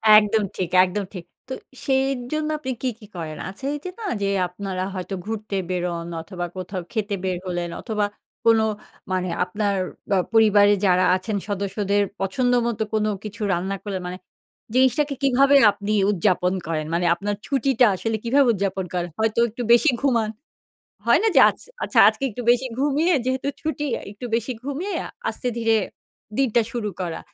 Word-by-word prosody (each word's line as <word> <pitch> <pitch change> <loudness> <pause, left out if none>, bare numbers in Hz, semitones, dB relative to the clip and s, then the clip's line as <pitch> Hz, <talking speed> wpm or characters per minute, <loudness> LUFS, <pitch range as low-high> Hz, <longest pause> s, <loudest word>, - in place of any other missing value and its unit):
একদম 210 0 +5
ঠিক, 180 -3 -1 0.2
একদম 200 +3 -3
ঠিক। 175 -3 -7 0.2
তো 260 - -4 0.3
সেই 265 0 +3 0.3
জন্য 310 0 -1
আপনি 260 -3 -3
কি, 260 - +1
কি 210 - -13
করেন? 155 -3 -5
আছে 195 +7 -12
এই 295 - -4
যে - - -2
না - - -7 0.2
যে, 200 - +1 0.2
আপনারা 185 0 -4
হয়তো 185 +1 -5
ঘুরতে 215 -2 -4
বেরোন 175 -2 -2
অথবা 175 +1 -5
কোথাও 185 0 -4
খেতে 210 -3 -1
বের 185 -1 -1
হলেন 175 -1 -2
অথবা 210 -3 -1 0.4
কোন 225 -1 +6 0.5
মানে 185 -1 0
আপনার 200 +2 -1 0.4
আ - - +3 0.2
পরিবারের 205 -2 +5
যারা 180 0 +4
আছেন 200 +3 -2
সদস্যদের 200 0 0 0.2
পছন্দ 245 +6 +1
মতো 220 -2 -1
কোনো 215 0 +1
কিছু 210 +1 -8
রান্না 190 +3 -1
করলেন 195 -3 -4
মানে 180 +1 -5 0.6
জিনিসটাকে 275 +3 +3
কিভাবে 275 +1 +5
আপনি 205 +1 -4 0.2
উদযাপন 185 -1 +1
করেন? 155 -2 -2
মানে 175 +1 +1
আপনার 205 +4 -3
ছুটিটা 265 -3 +3
আসলে 225 +4 -2
কিভাবে 270 +3 +4
উদযাপন 195 -1 -1
করেন? 175 -1 -1
হয়তো 220 0 0
একটু 235 +3 -6
বেশি 240 +5 +6
ঘুমান। 235 -6 +2 0.8
হয় - - +5
না - - +4
যে - - +8
আচ্ছা - - -10 0.2
আচ্ছা - - +2
আজকে 275 - -6
একটু 240 +3 -6
বেশি 250 +2 +1
ঘুমিয়ে 295 +5 +2
যেহেতু 260 +1 -1
ছুটি 310 -1 -2
আ - - -11
একটু 205 +4 -8
বেশি, 235 +2 -2
ঘুমিয়ে 300 +9 -3 0.4
আস্তে 250 - -4
ধীরে 225 -1 +2 0.6
দিনটা 240 -4 +3
শুরু 225 -4 -2
করা। 170 -2 -3
210 Hz, 170 wpm, -23 LUFS, 185-250 Hz, 0.8 s, যে